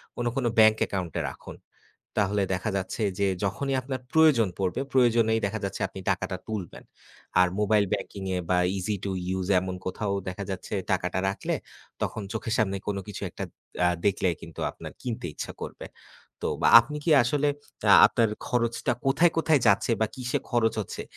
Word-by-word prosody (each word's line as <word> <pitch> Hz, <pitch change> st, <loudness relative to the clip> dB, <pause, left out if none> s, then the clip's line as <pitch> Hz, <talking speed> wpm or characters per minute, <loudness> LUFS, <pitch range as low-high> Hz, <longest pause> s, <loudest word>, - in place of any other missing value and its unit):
কোনো, 120 Hz, 0 st, -1 dB
কোনো 135 Hz, -3 st, 0 dB
bank 110 Hz, 0 st, +7 dB
account-এ 90 Hz, -5 st, -3 dB
রাখুন। -, -, -11 dB, 0.6 s
তাহলে 100 Hz, 0 st, +1 dB
দেখা 95 Hz, +4 st, -2 dB
যাচ্ছে 95 Hz, +4 st, -3 dB, 0.2 s
যে 100 Hz, -, +2 dB, 0.2 s
যখনই 135 Hz, +8 st, -1 dB
আপনার 130 Hz, 0 st, -4 dB
প্রয়োজন 155 Hz, -9 st, +5 dB
পড়বে, 95 Hz, +5 st, -1 dB
প্রয়োজনেই 115 Hz, -3 st, +3 dB
দেখা 105 Hz, +2 st, -4 dB
যাচ্ছে 100 Hz, -, -4 dB
আপনি 95 Hz, -, -9 dB
টাকাটা 95 Hz, 0 st, -1 dB
তুলবেন। 105 Hz, -6 st, -5 dB, 0.6 s
আর 90 Hz, -, +6 dB
mobile 105 Hz, 0 st, +3 dB
banking-এ 95 Hz, -2 st, -3 dB
বা 90 Hz, -, +4 dB, 0.2 s
easy 100 Hz, +3 st, -1 dB
to 100 Hz, -, -2 dB, 0.3 s
use 95 Hz, -1 st, -3 dB
এমন 95 Hz, 0 st, -4 dB
কোথাও 100 Hz, +2 st, -2 dB, 0.2 s
দেখা 95 Hz, +2 st, -5 dB
যাচ্ছে 95 Hz, +2 st, -5 dB, 0.2 s
টাকাটা 90 Hz, 0 st, 0 dB
রাখলে 100 Hz, -, -2 dB, 0.5 s
তখন 110 Hz, -, -2 dB
চোখের 115 Hz, -3 st, -2 dB
সামনে 100 Hz, -3 st, +1 dB
কোনো 100 Hz, -1 st, -1 dB
কিছু 105 Hz, -, -7 dB
একটা -, -, -5 dB, 0.4 s
আ -, -, +5 dB, 0.2 s
দেখলেই 95 Hz, -3 st, +2 dB
কিন্তু -, -, -9 dB
আপনার -, -, -10 dB
কিনতে 115 Hz, -7 st, -4 dB
ইচ্ছা -, -, -5 dB
করবে। -, -, -7 dB, 0.6 s
তো -, -, 0 dB
বা -, -, +5 dB
আপনি 130 Hz, +6 st, -6 dB
কি -, -, +1 dB
আসলে 145 Hz, +4 st, +1 dB, 0.4 s
আ -, -, +9 dB
আপনার 115 Hz, -1 st, +2 dB, 0.2 s
খরচটা 120 Hz, 0 st, 0 dB
কোথায়, 160 Hz, +5 st, +4 dB
কোথায় 160 Hz, -3 st, +3 dB
যাচ্ছে 100 Hz, +4 st, +3 dB
বা 110 Hz, -, +3 dB
কীসে 125 Hz, -1 st, -1 dB
খরচ 115 Hz, -3 st, +2 dB
হচ্ছে 100 Hz, -, -5 dB
110 Hz, 170 wpm, -27 LUFS, 95-120 Hz, 0.6 s, আ